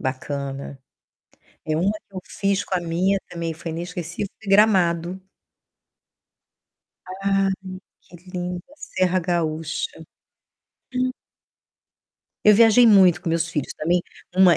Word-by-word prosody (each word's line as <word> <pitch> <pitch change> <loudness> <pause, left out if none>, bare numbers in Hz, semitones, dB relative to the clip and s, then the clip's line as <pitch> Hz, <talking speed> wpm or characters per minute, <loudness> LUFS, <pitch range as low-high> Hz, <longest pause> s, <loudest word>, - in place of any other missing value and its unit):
Bacana. 135 +1 -4 0.9
É, 155 - 0
uma 180 +6 +2
que 210 -2 -11
eu 185 - -4
fiz 200 0 -1
com 190 - -2
a 180 - +1
minha 175 +4 +1
também 165 -1 -4
foi 165 +1 -7
inesquecível, 175 +3 -5
foi 210 - -8
Gramado. 185 -4 +3 2.1
Ai, 195 0 +2 0.5
que 175 - -16 0.2
linda 180 -1 -3
a - - -17
Serra 185 -5 0
Gaúcha. 165 - -2 1.1
Hum. 255 0 +1 1.3
Eu 210 0 +8
viajei 230 +2 +6
muito 185 -5 +6
com 180 - -4
meus 165 +1 0
filhos 150 -5 -3
também. 175 +3 +1 0.3
Uma 185 -2 +6
180 Hz, 120 wpm, -23 LUFS, 165-195 Hz, 2.1 s, Eu